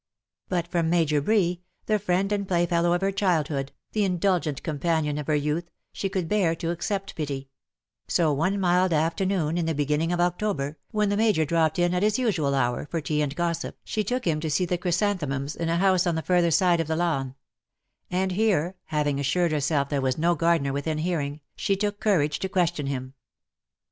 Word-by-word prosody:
But 175 -2 -1
from 170 -2 0
Major 160 -4 +2
Bree, 180 -1 +1 0.2
the 215 -1 +1
friend 190 0 0
and 200 -1 -1
play 175 -2 +2
fellow 170 0 +2
of 175 - 0
her 195 0 +1
childhood, 155 -8 0 0.2
the 215 - +1
indulgent 180 -5 0
companion 155 -1 0
of 150 - -6
her 155 - +2
youth, 150 +4 -1 0.2
she 195 - -2
could 185 -3 -2
better 210 +4 +1
bear 165 -3 +2
to 165 0 -3
accept 195 +3 -3
pity 140 -3 -4 0.3
— - - -59
so, 160 -4 +2
one 185 +8 0
mild 180 -1 +3
afternoon 165 +1 0
in 165 - -1
the 165 - 0
beginning 150 +3 0
of 175 - -1
October, 175 -5 -1
when 210 -1 +1
the 205 - 0
Major 210 -8 +3
dropped 160 0 +1
in 175 0 +2
at 180 - 0
his 210 +1 +2
usual 175 - +1
hour 125 +1 0
for 165 - -1
tea 150 0 -1
and 145 -1 -2
gossip, 170 0 -2
she 215 - -2
took 250 +5 -2
him 160 -3 +1
to 160 0 -3
see 150 +5 +1
the 175 0 -1
chrysan 185 +3 +1
themums, 140 -1 -3
in 165 -1 -2
a 165 - +1
house 185 -1 +3
on 170 - +1
the 160 - -2
further 175 -2 +3
side 170 +1 +3
of 165 - -1
the 160 - 0
lawn; 140 -6 -1 0.7
and 185 +1 0
here, 185 -3 +1
having 145 -2 0
assured 170 +5 +1
herself 145 -2 0
there 145 -2 0
was 130 -1 0
no 170 +2 +3
gardener 165 -5 +1
within 150 +3 -2
hearing, 155 -3 -2
she 195 - 0
took 205 +1 -2
courage 155 -8 +1
to 190 - -3
question 175 -6 0
him. 130 -1 -4
170 Hz, 210 wpm, -26 LUFS, 150-185 Hz, 0.7 s, mild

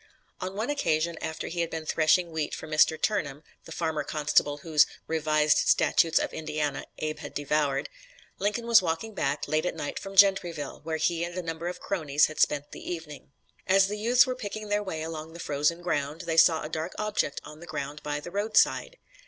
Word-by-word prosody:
On 185 +1 -5
one 220 +7 -1
occasion 170 - 0
after 160 0 -4
he 170 - -5
had 170 - -1
been 160 -1 -5
threshing 165 +3 +2
wheat 160 -2 -2
for - - -8
Mr. 155 0 +3
Turnham, 155 -9 -1 0.2
the - - -11
farmer 160 -3 -2
constable 145 -1 +1
whose 155 -3 +5 0.2
"Revised 155 -1 +2
Statutes 165 0 +3
of - - 0
Indiana" 150 -2 -3
Abe 155 0 -3
had - - -9
devoured, 145 -1 0 0.5
Lincoln 210 +4 -1
was 235 -1 +6
walking 180 +6 -3
back, 145 -6 -1
late 155 0 +1
at - - -3
night 150 -3 -4
from 195 0 -8
Gentryville, 180 -7 +3
where 160 0 -2
he 165 +1 0
and 175 +1 -5
a 180 - -2
number 165 +1 -4
of 180 - -5
cronies 150 -7 +2
had 155 - -6
spent 145 -1 +1
the - - -7
evening. 155 -5 -8 0.4
As 195 +1 +4
the 210 - -3
youths 245 +3 +5
were 255 - -2
picking 215 -3 -6
their 205 0 +1
way 160 -6 -4
along 160 0 -6
the 170 - -10
frozen 150 +3 0
road, 150 -2 -2
they 165 - -2
saw 165 0 +5
a - - -4
dark 160 +2 -4
object 210 -9 -1
on 150 +1 -11
the 175 - -11
ground 145 +2 -5
by 145 0 -3
the 175 +4 -9
roadside. 215 - +2
160 Hz, 200 wpm, -27 LUFS, 150-185 Hz, 0.5 s, was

